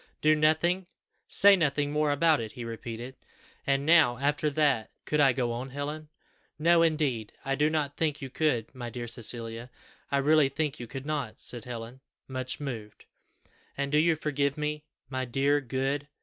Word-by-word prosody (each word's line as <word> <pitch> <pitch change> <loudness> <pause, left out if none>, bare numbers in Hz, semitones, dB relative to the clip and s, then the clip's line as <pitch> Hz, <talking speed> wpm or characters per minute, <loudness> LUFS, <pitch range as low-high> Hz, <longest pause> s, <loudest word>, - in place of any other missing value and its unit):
'Do 155 0 +5
nothing, 160 +4 +2 0.4
say 200 0 +8
nothing 145 -4 0
more 150 0 +1
about 155 -1 +3
it,' 110 -2 -6
he 120 - -7
repeated; 115 +2 -7 0.5
and 140 0 +1
now, 155 -7 +5
after 145 +3 0
that, 140 -6 +1 0.2
could 150 - 0
I 140 -2 +6
go 120 -1 -1
on, 125 +3 -4
Helen?" 150 +3 -5 0.5
"No, 170 +2 +4
indeed; 150 -9 0
I 135 - 0
do 150 +2 +2
not 150 -3 -2
think 155 -3 0
you 135 -3 -7
could. 135 -7 0
My 120 -2 -6
dear 120 +1 -6
Cecilia, 115 +1 -4 0.4
I 140 - +2
really 145 0 +4
think 150 +1 -2
you 120 - -6
could 135 +3 -7
not," 145 -7 -3
said 120 -3 -4
Helen, 120 +1 -7 0.3
much 130 0 -4
moved. 115 -7 -7 0.7
"And 140 0 -2
do 150 - +4
you 165 +1 +3
forgive 145 -2 -1
me, 150 0 -3 0.2
my 130 -1 -3
dear, 135 +4 +1
good 135 +3 -2
140 Hz, 175 wpm, -28 LUFS, 125-150 Hz, 0.7 s, say